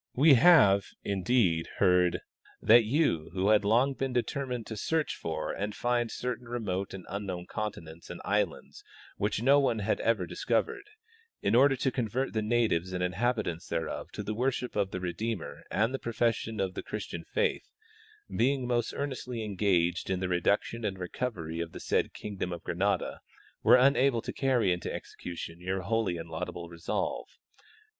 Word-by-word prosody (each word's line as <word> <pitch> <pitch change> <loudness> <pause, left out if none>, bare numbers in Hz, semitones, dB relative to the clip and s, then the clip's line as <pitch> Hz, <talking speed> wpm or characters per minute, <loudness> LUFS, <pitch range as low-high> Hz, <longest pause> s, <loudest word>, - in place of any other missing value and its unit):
We 145 +3 +7
have, 110 - +6 0.2
indeed, 95 -4 +1
heard 90 -1 +3 0.4
that 115 +1 +6
you, 115 - +1
who 95 +2 +1
had 105 -1 +5
long 120 +7 +3
been 135 -1 -3
determined 125 -1 -2
to 110 - -6
search 160 +8 -1
for 80 -1 -3
and 105 +1 -3
find 120 -1 0
certain 125 0 -4
remote 100 -5 -3
and 95 - -9
unknown 95 -3 -4
continents 85 -7 -6
and 90 - -7
islands 105 -3 -1 0.3
which 105 +2 -1
no 140 +3 +6
one 135 -5 +2
had 105 0 0
ever 110 -5 +1
dis - - -7
covered, 120 - 0 0.6
in 100 - +2
order 135 +3 +6
to 130 0 0
convert 125 +2 -1
the 110 - 0
natives 105 -6 +1
and 90 0 -1
inhabitants 95 -2 -1
thereof 85 -1 -3
to - - -4
the 110 - -3
worship 125 +2 -1
of 100 -2 +1
the 95 - -4
Redeemer 90 +3 -4
and 110 +6 +1
the 135 - -2
profession 115 -1 -1
of 95 -1 -1
the - - -4
Christian - - -6
faith, - - -1 0.7
being 130 +2 +2
most 120 -2 0
earnestly 125 -4 -4
engaged 90 -4 +1
in 95 -1 0
the 95 - -1
reduction 100 +6 0
and 100 -3 -2
recovery 90 -3 -4
of 85 -1 -4
the - - -7
said - - 0
kingdom 100 -3 -5
of 85 -1 -6
Granada, 100 +4 -1 0.4
were - - +7
unable 130 -2 +4
to - - -5
carry 125 -9 +2
into 90 - -4
exe - - -7
cution 85 -1 -6
your 95 +1 -2
holy 100 -2 0
and 85 0 -7
laudable 85 +1 -5
resolve. 85 -1 -3
105 Hz, 170 wpm, -30 LUFS, 90-120 Hz, 0.7 s, We